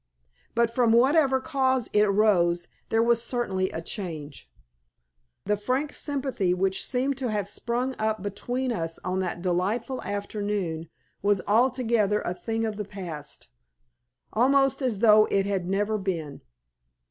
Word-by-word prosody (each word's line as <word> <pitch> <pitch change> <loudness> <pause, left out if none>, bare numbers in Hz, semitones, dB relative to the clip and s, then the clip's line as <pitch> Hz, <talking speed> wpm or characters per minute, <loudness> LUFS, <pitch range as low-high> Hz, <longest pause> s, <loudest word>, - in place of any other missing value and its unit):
But 235 0 +2
from 235 -2 +3
whatever 265 +2 +4
cause 260 -4 0
it 210 - +5
arose 195 -5 +3 0.2
there 225 0 +3
was 235 0 +3
certainly 190 -8 -1
a 165 - -5
change. 155 - -6 1.0
The 210 +1 +2
frank 255 +8 -1
sympathy 265 - -1
which 190 +1 0
seemed 265 +1 -1
to 255 -3 -1
have 205 -3 -1
sprung 245 +5 -2
up 215 -2 -1
between 245 +6 -2
us 165 -7 -2
on 185 +1 -1
that 175 -2 -3
delightful 205 +8 -1
afternoon 200 -5 -3 0.3
was 200 -1 +2
altogether 225 -2 +2
a 175 - -2
thing 225 +4 -2
of 215 -2 -3
the 210 - -2
past, 175 -8 -7 0.8
almost 270 +4 +3
as 250 -6 0
though 215 0 +7
it 195 -2 +1
had 190 -3 -2
never 205 +2 0
been. 165 -7 -4
210 Hz, 140 wpm, -26 LUFS, 190-245 Hz, 1.0 s, though